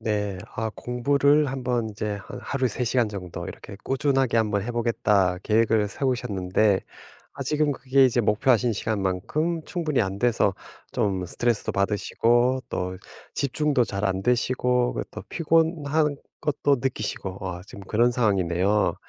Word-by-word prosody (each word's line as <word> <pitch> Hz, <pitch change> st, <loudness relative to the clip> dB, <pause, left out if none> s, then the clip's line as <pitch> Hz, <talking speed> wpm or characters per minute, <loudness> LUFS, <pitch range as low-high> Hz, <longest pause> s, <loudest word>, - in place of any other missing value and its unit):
네 105 Hz, -4 st, -1 dB, 0.2 s
아 110 Hz, 0 st, -1 dB
공부를 140 Hz, +4 st, +2 dB
1 135 Hz, -1 st, -4 dB
번 120 Hz, -2 st, 0 dB
이제 105 Hz, 0 st, -3 dB
한 -, -, -8 dB
하루에 130 Hz, -2 st, 0 dB
3 120 Hz, +2 st, -2 dB
간 120 Hz, -3 st, +3 dB
정도 90 Hz, -4 st, -6 dB
이렇게 100 Hz, -, -9 dB
꾸준하게 135 Hz, -2 st, +1 dB
한번 105 Hz, -3 st, +1 dB
해보겠다. 105 Hz, -5 st, +1 dB
계획을 110 Hz, -1 st, +3 dB
세우셨는데 105 Hz, -5 st, +1 dB, 0.5 s
아직은 145 Hz, +2 st, 0 dB
그게 135 Hz, 0 st, +3 dB
이제 125 Hz, -1 st, +3 dB
목표하신 120 Hz, +2 st, +2 dB
시간만큼 110 Hz, -, -1 dB
충분히 160 Hz, -, 0 dB
안 95 Hz, 0 st, -3 dB
돼서 110 Hz, -4 st, +2 dB, 0.4 s
좀 95 Hz, -3 st, 0 dB
스트레스도 120 Hz, +5 st, -1 dB
받으시고, 120 Hz, +5 st, +2 dB
또 90 Hz, 0 st, -3 dB, 0.3 s
집중도 140 Hz, -1 st, +1 dB
잘 100 Hz, -2 st, -3 dB
안 95 Hz, -1 st, 0 dB
되시고, 125 Hz, +1 st, +1 dB
그 -, -, -2 dB
또 -, -, -8 dB
피곤한 160 Hz, -3 st, +1 dB, 0.2 s
것도 145 Hz, -1 st, +1 dB
느끼시고 105 Hz, -6 st, -3 dB
아 90 Hz, -1 st, -6 dB
지금 100 Hz, -, -11 dB
그런 115 Hz, +5 st, +2 dB
상황이네요. 100 Hz, -3 st, +1 dB
120 Hz, 305 characters per minute, -25 LUFS, 100-135 Hz, 0.5 s, 간